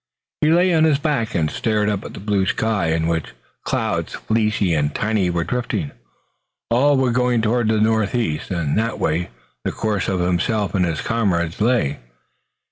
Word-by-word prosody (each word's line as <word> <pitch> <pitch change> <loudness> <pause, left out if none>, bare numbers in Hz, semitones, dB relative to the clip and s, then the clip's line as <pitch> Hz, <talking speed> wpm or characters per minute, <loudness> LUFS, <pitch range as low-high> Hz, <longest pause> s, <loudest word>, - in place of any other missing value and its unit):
He 150 - +3
lay 175 +2 +4
on 160 -1 +4
his 155 -3 +3
back 140 -7 -1
and 80 -3 +1
stared 105 -2 0
up 105 -2 -1
at - - -9
the - - -7
blue 100 -1 0
sky, 110 -6 0
in 80 0 0
which 80 -4 -2 0.3
clouds - - -2
fleecy 105 -5 0
and 75 -2 0
tiny 105 -4 +1
were 85 -1 0
drifting. 125 - -2 0.8
All 140 +4 +4
were 130 -2 +2
going 125 0 +2
toward 115 +1 +1
the 110 -1 +2
northeast 110 -5 0
and 85 -6 -1
that 115 +1 -1
way 85 +1 -1 0.3
the - - -1
course 105 -4 -1
of 95 -2 0
himself 90 +4 0
and 95 -3 +2
his 80 -4 -2
comrades 95 -6 -1
lay. 110 - +1
105 Hz, 175 wpm, -21 LUFS, 85-115 Hz, 0.8 s, lay